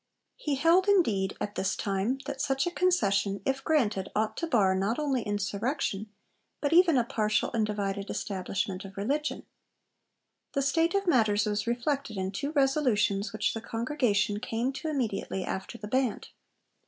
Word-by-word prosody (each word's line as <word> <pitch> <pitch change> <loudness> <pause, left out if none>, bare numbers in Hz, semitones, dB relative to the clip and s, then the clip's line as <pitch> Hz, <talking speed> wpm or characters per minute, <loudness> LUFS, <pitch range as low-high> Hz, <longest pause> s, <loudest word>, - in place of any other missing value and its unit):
He 295 -2 -2
held, 335 +7 +4
indeed, 220 - +2
at 205 - -3
this 195 -2 -1
time, 200 +6 -1
that 280 -1 -4
such 270 0 +1
a 350 - -1
concession, 200 - +1
if 270 0 -1
granted, 215 -11 +1
ought 215 +1 0
to 335 - -2
bar 205 -10 +3
not 195 +5 0
only 280 -5 0
insurrection, 205 +1 -2 0.5
but 290 +1 0
even 340 -4 +6
a 245 - +4
partial 215 -2 0
and 220 -2 +1
divided 200 -1 -3
establishment 190 0 -3
of 195 0 -11
religion. 285 +9 -2 1.1
The 275 - +1
state 325 +6 +2
of 395 0 +1
matters 220 - +3
was 210 +1 -1
reflected 240 -1 -1
in 190 0 -2
two 280 +9 -3
resolutions 245 -8 +2
which 215 -1 0
the 225 - -5
Congregation 230 -3 0
came 240 +3 -2
to 315 - -5
immediately 225 -9 -2
after 190 +5 -5
the 210 - -7
Band. 255 0 -1
225 Hz, 160 wpm, -29 LUFS, 200-280 Hz, 1.1 s, even